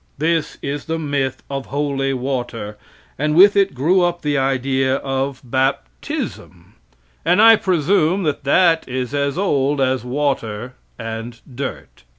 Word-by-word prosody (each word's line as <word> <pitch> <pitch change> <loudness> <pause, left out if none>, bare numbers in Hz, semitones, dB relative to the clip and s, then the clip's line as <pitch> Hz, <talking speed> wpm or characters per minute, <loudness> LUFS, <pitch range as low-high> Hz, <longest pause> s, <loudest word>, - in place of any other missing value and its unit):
This 160 +1 0
is 140 +1 -4
the 165 0 -2
myth 140 -4 -2
of 135 -1 -5
holy 140 -1 -1
water, 125 -5 -3 0.4
and 150 +1 0
with 200 +4 +7
it 195 -7 +2
grew 170 +9 +3
up 175 0 0
the 145 -1 0
idea 135 0 +1
of 135 0 -3
baptism, 130 - -3 0.5
and 180 +3 +3
I 225 +1 +9
presume 185 0 +1
that 150 -3 -2
that 165 +3 +3
is 125 +1 -3
as 140 0 -1
old 145 -7 +1
as 130 -1 +1
water 125 -3 -2 0.2
and 115 0 -6
dirt. 130 - -7
140 Hz, 140 wpm, -19 LUFS, 130-160 Hz, 0.5 s, I